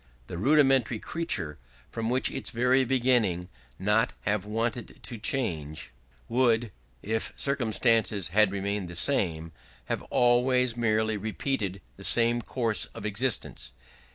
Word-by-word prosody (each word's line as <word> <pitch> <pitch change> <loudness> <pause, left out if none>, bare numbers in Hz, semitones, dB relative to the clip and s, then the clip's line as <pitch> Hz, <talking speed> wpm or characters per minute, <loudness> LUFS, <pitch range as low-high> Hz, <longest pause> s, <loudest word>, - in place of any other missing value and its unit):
The 85 - -7
rudimentary 135 -1 +3
creature 80 - -2 0.3
would 115 -1 -3
from 125 +2 +1
its 135 - -3
very 125 +2 +2
beginning 120 -9 +1 0.3
not 105 +4 +1
have 105 -1 -1
wanted 115 +2 -3
to 115 - -6
change, 85 - -2 0.4
would, 120 -2 +2 0.3
if 110 +2 -2
circumstances 115 - +1
had 105 +2 +4
remained 100 -1 -2
the 85 - -8
same, 85 - +1 0.3
have - - -3
always 125 0 +3
merely 110 -2 +1
repeated 105 -2 -3 0.2
the - - -11
same 120 0 +3
course 115 -2 0
of - - -7
existence.... 105 - -2
115 Hz, 125 wpm, -27 LUFS, 100-125 Hz, 0.4 s, had